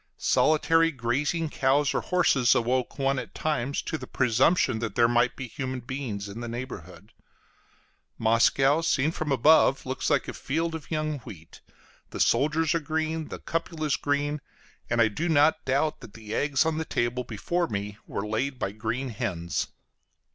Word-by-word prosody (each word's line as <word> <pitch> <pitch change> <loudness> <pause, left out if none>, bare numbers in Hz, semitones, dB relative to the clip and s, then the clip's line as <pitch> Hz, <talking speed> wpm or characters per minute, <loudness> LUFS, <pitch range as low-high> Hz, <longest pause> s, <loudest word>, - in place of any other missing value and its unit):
Solitary 165 +2 +3
grazing 145 +5 -1
cows 135 +2 +2
or - - 0
horses 140 -9 +3
awoke 125 +2 0
one 135 -1 +1
at - - -9
times 140 -3 -1
to 160 - -3
the - - -8
presumption 125 +1 +2
that 115 -3 -4
there 120 -1 +5
might 120 +1 +2
be 130 - -6
human 130 +2 -4
beings 120 -5 -5
in 100 +3 -8
the 120 - -5
neighborhood. 105 -5 -8 1.1
Moscow, 135 +6 +3
seen 155 -2 +1
from 155 -3 -3
above, 135 +1 +4
looks 130 0 -2
like 145 -4 +1
a - - -5
field 165 +4 -2
of 160 -2 -7
young 155 -2 -2
wheat: 85 -8 -12 0.5
the - - -7
soldiers 155 +2 +2
are 170 - +1
green, 160 +1 -2
the - - -6
cupolas 160 -3 -2
green, 145 +1 -1 0.5
and 115 - 0
I 115 - +6
do 155 +11 -2
not 155 0 +4
doubt 140 +4 0
that 105 - -12
the 110 -1 -8
eggs 145 +3 +2
on 160 -1 0
the - - -1
table 120 -1 -1
before 165 - -2
me 100 -2 -4
were 100 - -4
laid 125 +6 -2
by 95 - -2
green 115 +5 -3
hens. 85 -6 -3
135 Hz, 170 wpm, -27 LUFS, 115-155 Hz, 1.1 s, I